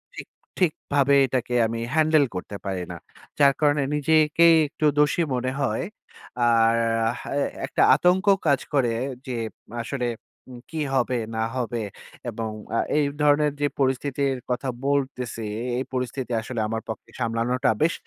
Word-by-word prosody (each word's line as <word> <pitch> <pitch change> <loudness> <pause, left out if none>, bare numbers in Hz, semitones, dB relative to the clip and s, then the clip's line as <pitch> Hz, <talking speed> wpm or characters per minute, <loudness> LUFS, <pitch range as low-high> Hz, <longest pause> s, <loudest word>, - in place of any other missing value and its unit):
ঠিক - - -8 0.3
ঠিকভাবে 145 -5 +1
এটাকে 125 -1 -2
আমি 115 +1 -4
হ্যান্ডেল 155 -2 +4
করতে 90 +3 -5
পারি 95 -2 -2
না। - - -6 0.4
যার 140 -1 +6
কারণে 145 -1 +3
নিজে-কেই 155 +2 +4
একটু 155 +1 -3
দোষী 150 +3 +3
মনে 130 +1 -1
হয়। 115 -5 0 0.6
আর 115 -1 +4 0.4
হ্যাঁ - - -8
এ - - +1 0.2
একটা - - -1
আতঙ্কও 190 +3 +4
কাজ 140 -3 +4
করে 130 -5 +2 0.4
যে 125 - -3 0.5
আসলে 125 0 -2 0.6
কি 160 - -5 0.2
হবে 125 -1 +1 0.2
না 110 - 0
হবে 120 -2 -2 0.5
এবং 115 -1 -4 0.3
আ - - +2 0.2
এই 150 - +3 0.2
ধরনের 150 0 +4
যে 145 - +3
পরিস্থিতির 135 0 0
কথা 125 +2 -1 0.2
বলতেছি, 130 -4 -1 0.3
এই 130 - -1
পরিস্থিতি 125 0 -3
আসলে 115 +1 -5
আমার 115 +1 -3
পক্ষে 110 - -7
সামলানোটা 120 +3 0
বেশ 165 +2 +3
135 Hz, 145 wpm, -24 LUFS, 120-150 Hz, 0.6 s, যার